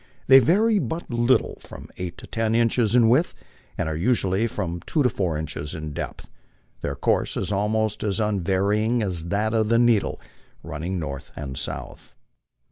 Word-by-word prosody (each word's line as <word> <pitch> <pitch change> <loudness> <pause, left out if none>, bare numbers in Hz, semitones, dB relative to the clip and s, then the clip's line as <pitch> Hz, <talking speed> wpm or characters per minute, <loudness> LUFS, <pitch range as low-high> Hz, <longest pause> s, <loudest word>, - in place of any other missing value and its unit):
They 135 0 +9
vary 205 - +3
but 165 -5 -4
little 120 +2 +2
from - - -11
eight 90 -2 -5
to - - -11
ten 115 0 -1
inches 115 -1 +2
in 120 -2 +6
width, 130 +9 +3 0.4
and 90 - -1
are 80 - -2
usually 100 +2 +1
from 85 -6 -4
two 150 - +1
to 125 - +4
four 90 -7 -1
inches 75 -1 -4
in 75 -2 -6
depth; - - -6 0.5
their 70 - -3
course - - 0
is - - -2
almost 105 +1 0
as 105 0 0
unvarying 105 +3 +1
as 90 -5 -2
that 105 +5 0
of 110 -1 +1
the 115 - +4
needle, 120 -3 +2 0.4
running 85 +6 -4
north 70 -5 -5
and 70 -2 -6
south. - - -6
105 Hz, 170 wpm, -24 LUFS, 85-115 Hz, 0.5 s, They